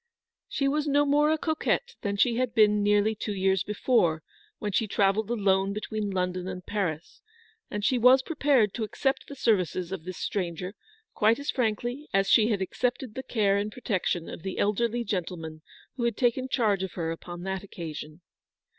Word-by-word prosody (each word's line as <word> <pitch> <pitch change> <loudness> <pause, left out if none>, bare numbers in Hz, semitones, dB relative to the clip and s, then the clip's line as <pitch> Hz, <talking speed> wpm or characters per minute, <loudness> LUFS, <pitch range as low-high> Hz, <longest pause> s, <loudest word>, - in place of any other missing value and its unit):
She 275 - 0
was 300 +2 0
no 290 0 +3
more 295 +1 +3
a 315 - +2
coquette 340 +10 -1
than 200 -1 -2
she 235 +3 +3
had 250 -2 -1
been 210 -2 +5
nearly 205 +1 +3
two 210 -1 -4
years 190 -1 +2
before 190 -7 +1 0.3
when 210 - -3
she 220 +3 +1
travelled 200 +1 +1
alone 195 -3 +2
between 210 0 -3
London 180 -1 -2
and 180 -1 -6
Paris, 180 -6 -3 0.5
and 205 0 -3
she 255 - +2
was 255 +3 +6
prepared 275 - +2
to 230 - -3
accept 270 +5 -1
the 280 - -8
services 185 - 0
of 190 -4 -5
this 185 +1 -7
stranger 180 -1 -3 0.4
quite 220 +2 +3
as 285 +1 -2
frankly 245 +4 -2
as 195 0 +3
she 215 +1 +5
had 205 -4 0
accepted 250 +3 -2
the 260 - -4
care 210 -6 +1
and 205 +1 -2
protec 210 -6 -2
tion 170 -2 -1
of - - -8
the 190 +2 -5
elderly 235 +3 +1
gentleman 165 -6 -4 0.4
who 240 - -1
had 235 -3 0
taken 255 +1 +1
charge 215 -7 +1
of 190 -2 -4
her 165 -2 -2
upon 175 +1 -7
that 190 0 -3
occasion. 160 -6 -7
GILBERT 155 +3 -19
MONCKTON. - - -65
210 Hz, 190 wpm, -27 LUFS, 185-245 Hz, 0.5 s, was